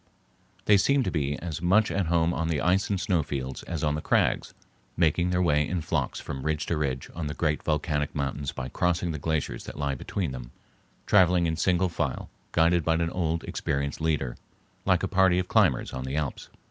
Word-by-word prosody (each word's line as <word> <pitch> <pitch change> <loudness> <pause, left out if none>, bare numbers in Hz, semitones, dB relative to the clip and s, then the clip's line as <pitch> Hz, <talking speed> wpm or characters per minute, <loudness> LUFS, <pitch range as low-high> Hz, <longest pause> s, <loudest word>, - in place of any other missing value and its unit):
They 105 - +6
seem 140 +6 +3
to - - -1
be 75 -3 -1
as 85 -2 -5
much 100 +5 +3
at 95 -3 0
home 85 0 +2
on 85 -1 -1
the 80 -3 0
ice 90 +7 +2
and 100 -2 0
snowfields 70 -9 -1
as 80 -3 -5
on 75 -1 +2
the 75 - -2
crags, - - +1 0.4
making 85 +1 +2
their 90 0 +1
way 75 -3 +2
in 90 -2 -2
flocks 75 -4 -2
from 65 - -6
ridge 75 +1 -1
to 80 - -1
ridge 65 -4 -2
on 80 -2 -4
the 75 - -4
great 75 -1 0
volcanic 75 -1 -1
mountains 70 0 -2
by 65 - -5
crossing 85 +4 0
the 75 - -4
glaciers 75 -5 -2
that - - -8
lie 70 -1 -1
between 80 +4 -3
them, 65 -2 -7 0.6
traveling 90 -3 +4
in 80 -1 0
single 90 +2 +2
file 85 - -3 0.2
guided 85 +1 +3
by 80 +1 +2
an 85 0 0
old 85 -2 -1
experienced 70 +1 -2
leader, 75 -6 -1 0.5
like - - +3
a - - +1
party 95 -1 +3
of 90 0 0
climbers - - +2
on 65 - -4
the 65 +2 -4
Alps. 75 -3 -3
80 Hz, 205 wpm, -27 LUFS, 75-90 Hz, 0.6 s, They